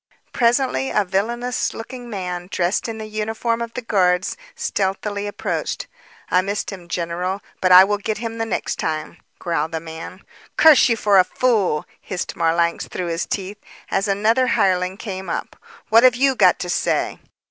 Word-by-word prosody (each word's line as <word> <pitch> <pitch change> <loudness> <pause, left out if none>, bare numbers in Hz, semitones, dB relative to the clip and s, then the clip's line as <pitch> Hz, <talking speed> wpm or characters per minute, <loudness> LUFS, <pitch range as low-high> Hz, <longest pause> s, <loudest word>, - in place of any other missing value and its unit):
Presently, 235 - +2
a 205 - +1
villainous 235 +6 -1
looking 245 +1 -8
man 180 -4 -4
dressed 180 +5 0
in 225 - -5
the 220 - -6
uniform 220 +2 -2
of 235 -1 -4
the 250 - -4
guards, 185 -4 +1 0.2
stealthily 205 - -2
approached. 205 - -3 0.5
"I 180 - +4
missed 200 +3 -3
him, 180 -3 -10
general, 180 +3 -3 0.2
but 185 - +3
I 180 +1 +11
will 205 +1 0
get 215 +1 -2
him 230 0 -5
the 225 - 0
next 225 - -2
time." 155 +1 -3 0.2
growled 165 -2 -2
the 160 - -1
man. 160 0 -9 0.3
"Curse 310 -5 +7
you 230 - +3
for 205 -3 +4
a - - +7
fool!" 200 -7 +1 0.2
hissed 185 -2 -5
Marlanx 170 0 +1
through 180 -2 -4
his 165 +1 -2
teeth. 200 +1 -4 0.3
As 195 +2 +1
another 220 +6 +2
hireling 185 -2 +1
came 190 -4 -6
up. - - -4 0.3
"What 225 +1 +7
have 255 -1 +6
you 270 +2 +3
got 260 - +4
to - - -4
say?" - - 0
195 Hz, 170 wpm, -21 LUFS, 180-225 Hz, 0.5 s, I